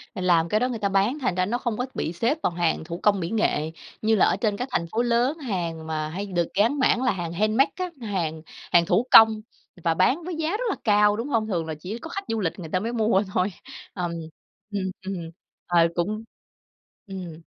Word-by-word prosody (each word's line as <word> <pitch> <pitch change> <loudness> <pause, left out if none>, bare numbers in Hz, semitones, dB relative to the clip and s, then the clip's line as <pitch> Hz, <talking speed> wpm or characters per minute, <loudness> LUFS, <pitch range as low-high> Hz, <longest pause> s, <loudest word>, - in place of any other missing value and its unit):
làm 175 -3 +2
cái 215 - +2
đó 250 +1 +1
người 230 -3 -4
ta 200 -2 0
bán, 200 +9 +1
thành 195 -9 0
ra 185 0 +1
nó 235 +5 -1
không 240 -4 -2
có 250 - -1
bị 165 - -3
xếp 235 - 0
vào - - +2
hàng 170 -2 0
thủ 170 +2 -6
công 205 -2 +4
mỹ 170 0 -3
nghệ 160 -8 0 0.3
như 220 0 +3
là 195 - +5
ở - - +2
trên 210 -3 0
các 250 - -3
thành 170 - 0
phố 230 - +1
lớn, 245 +5 +1
hàng 170 - -4
mà 155 -1 -2
hay 195 +5 -4
được 175 -4 -1
gán 230 +8 +2
mảng 255 -1 +3
là 255 - +3
hàng 175 -4 -4
handmade 215 +8 +3
á, 365 -1 -3
hàng 170 -7 -2 0.3
hàng 170 -1 +5
thủ 195 +7 +2
công 220 -1 +8 0.4
và 165 -1 +3
bán 255 - +2
với 355 -1 -4
giá 320 0 -1
rất 445 +4 -2
là - - 0
cao, 210 -1 +4
đúng 235 +5 -3
hông? 225 -4 +1
Thường 175 -6 -1
là 160 - -4
chỉ 195 +8 -5
có 325 - -8
khách 395 +3 -4
du 225 - -1
lịch 185 -1 -2
người 160 -3 -7
ta 185 - +1
mới 230 +4 -3
mua 215 -3 +2
thôi, 180 +1 +2 0.5
ùm. 175 -2 -2 0.6
Ừm, 190 -2 -2
ừm, 195 - -3 0.5
ờ, 170 -1 +4
cũng 210 +6 -1 0.8
ừm. 175 -4 -7
205 Hz, 230 wpm, -25 LUFS, 175-235 Hz, 0.8 s, công